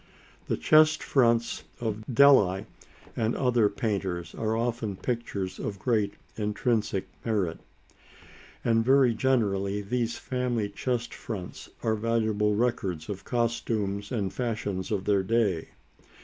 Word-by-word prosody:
The - - 0
chest 155 - +5
fronts 115 -3 +2 0.2
of 110 -2 -3
Delli 115 -8 +5 0.5
and 115 +1 0
other 120 -5 +3
painters 100 -5 -2
are 110 0 -1
often 115 -3 -2
pictures 100 -4 -3
of 100 - -4
great 105 -2 0 0.2
intrinsic 105 -2 -1 0.2
merit, 100 -7 -1 1.1
and 115 -1 +3
very 130 -1 +5
generally 105 -6 +1
these 120 +2 -1
family 125 -5 -1
chest 120 +3 -2
fronts 95 -6 -7
are 110 - +2
valuable 110 -2 +1
records 100 -8 -1
of 100 -1 -5
costumes 110 -4 -1
and 100 -6 -1
fashions 110 -6 -3
of 100 -3 -1
their 100 -2 +3
day. 100 -5 +1
110 Hz, 120 wpm, -28 LUFS, 100-120 Hz, 1.1 s, chest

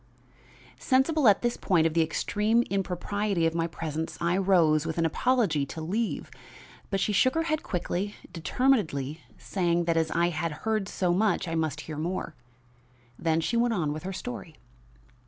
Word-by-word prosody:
Sensible 270 +1 +3
at 205 +1 +5
this 240 0 0
point 175 -5 +2
of 165 - +1
the 165 - +3
extreme 210 +8 +1
impropriety 195 0 -1
of 165 - +1
my 165 0 0
presence, 160 -1 -4
I 170 +1 +1
rose, 175 -6 +3
with 160 0 -4
an 165 - +2
apology, 195 - +1
to 160 - -7
leave. 205 +8 -2 0.6
But 195 - 0
she 210 - 0
shook 255 +7 +3
her 325 - +2
head 310 -2 -1
quickly, 185 +2 -3 0.2
determinedly, 165 - 0 0.2
saying 175 -3 0
that 165 -1 +1
as 160 -1 +1
I 170 +2 +2
had 165 0 -2
heard 215 -3 0
so 180 -2 0
much 200 -1 +1
I 165 - -3
must 160 -3 -1
hear 155 -2 -7
more. 170 +1 -3 0.9
Then 165 0 +1
she 235 - -1
went 235 0 +2
on 155 -6 0
with 155 - -6
her 190 - -5
story. 200 -6 -7
175 Hz, 175 wpm, -27 LUFS, 160-215 Hz, 0.9 s, at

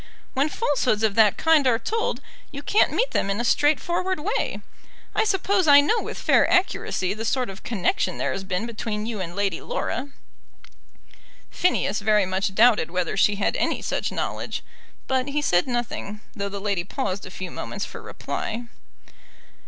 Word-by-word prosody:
When 275 +3 +1
falsehoods 255 - 0
of 215 -2 +3
that 215 -2 +4
kind 320 -4 +4
are 235 -2 +4
told 445 - -2 0.3
you 280 0 -8
can't 420 - +3
meet - - +1
them 195 - 0
in 200 +2 -1
a 240 - -1
straightforward 345 +7 +1
way. 415 +10 -2 0.5
I 430 - +2
suppose 385 -3 +1
I 285 -1 +9
know 305 +11 +2
with - - -6
fair - - +3
accuracy 200 - +1
the 215 +2 -5
sort 250 -1 0
of 195 - -12
connection 230 - -1
there - - -1
has 195 - -4
been 190 +2 -2
between 215 -2 -4
you 220 -3 -4
and 175 -1 -5
Lady 200 -4 -1
Laura." 280 - -3 1.4
Phineas 360 -10 +1
very 210 -1 +3
much 190 +1 -1
doubted 220 -6 +5
whether 180 0 -1
she 205 +2 +3
had 200 - 0
any - - 0
such - - -2
knowledge; - - -3 0.4
but 260 0 0
he 290 +1 -1
said 180 -10 +2
nothing, 240 -4 -3
though 200 -2 -3
the 200 0 -5
lady 200 -3 -1
paused 190 +1 -3
a - - -8
few 185 0 -7
moments - - -5
for - - -9
reply. 230 +2 -5
225 Hz, 175 wpm, -24 LUFS, 200-290 Hz, 1.4 s, I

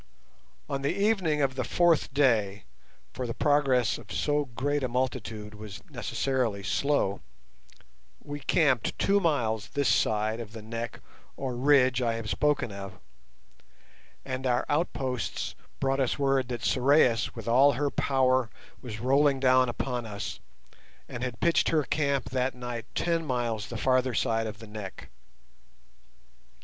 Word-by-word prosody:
On 140 -1 -3
the 140 - +1
evening 185 -6 +1
of 135 -1 +1
the 130 -1 -2
fourth 175 -4 +2
day, 110 -8 +2 0.5
for 125 -1 -4
the 115 - -4
progress 135 -5 +2
of - - -13
so 145 0 0
great 140 +4 -2
a - - +1
multitude 120 -4 -3
was 105 -2 -9
necessarily 125 -7 -1
slow, 105 0 0 1.0
we 145 0 -7
camped 140 -5 +1
two 200 +1 +3
miles 115 - 0
this 140 -2 +1
side 110 +1 +1
of 110 -2 -8
the 110 - -8
neck 115 +1 -5 0.4
or 130 -2 -3
ridge 130 -1 +4
I 115 -2 +1
have 115 -2 -4
spoken 145 -6 +1
of, 100 -1 -8 1.3
and 130 0 -3
our 125 0 +1
outposts 135 - -2 0.3
brought 135 0 +1
us 130 -3 +1
word 135 -2 +1
that 120 -2 -5
Sorais 130 -3 +3
with 115 -2 -8
all 135 +5 +5
her 140 +3 -1
power 130 -3 +2 0.3
was 110 -3 -7
rolling 135 +2 +3
down 130 -1 +4
upon 120 -1 -3
us, 100 -1 -5 0.7
and 120 - -7
had 125 -3 -4
pitched 170 -1 +3
her 155 -2 +2
camp 140 -1 -1
that 130 0 0
night 120 -2 -6
ten 170 -1 0
miles 120 -7 -2
the 120 - -6
farther 130 0 +1
side 115 +1 +1
of 105 -2 -6
the 110 - -11
neck. 105 -2 -8
130 Hz, 145 wpm, -28 LUFS, 115-140 Hz, 1.3 s, all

